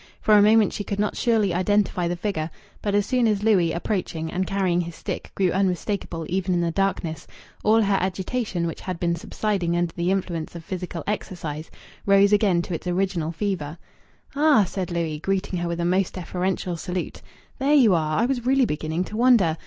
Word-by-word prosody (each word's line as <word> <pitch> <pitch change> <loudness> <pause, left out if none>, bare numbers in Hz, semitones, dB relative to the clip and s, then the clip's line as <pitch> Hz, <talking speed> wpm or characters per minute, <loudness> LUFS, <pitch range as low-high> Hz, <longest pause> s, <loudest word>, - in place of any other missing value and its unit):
For 215 - +4
a 205 - +7
moment 215 0 +5
she 205 - -3
could 200 - -4
not 210 0 0
surely 220 -6 +2
identify 185 -1 +1
the 175 - -1
figure, 175 -4 -2 0.3
but 205 -1 0
as 205 -1 +2
soon 250 -1 +2
as 210 -2 0
Louis, 190 -7 +3
approaching, 170 -3 -3
and 185 +1 -1
carrying 185 -3 +1
his 170 -1 -6
stick, - - -6
grew 185 -3 +2
unmistakable 185 -2 -1
even 185 0 0
in 175 - +1
the 170 -1 0
darkness, 185 -3 -2 0.4
all 220 +1 +4
her 195 -1 +2
agitation, 190 0 -2
which 165 - -5
had 185 -3 -5
been 170 -1 +1
subsiding 175 0 -1
under 175 -1 -1
the 175 +1 -1
influence 175 -4 -2
of 165 -1 -8
physical 180 -3 -5
exercise, 165 -7 -4 0.4
rose 200 +1 +5
again 195 -5 +3
to 180 - -5
its 165 - -5
original 180 -3 0
fever. 170 -4 -3 0.6
"Ah!" 290 -7 +5
said 185 0 -4
Louis, 165 -3 -2
greeting 190 +1 -1
her 175 - -2
with 170 0 -3
a 170 - 0
most 185 +1 +1
deferential 180 0 -2
salute. 180 +2 -4 0.4
"There 280 +3 +3
you 240 -9 +6
are. 155 -2 +1
I 230 - +3
was 250 -2 -1
really 265 +1 +3
beginning 160 0 -2
to 210 - -8
wonder. 230 -10 +4
185 Hz, 195 wpm, -24 LUFS, 170-205 Hz, 0.6 s, a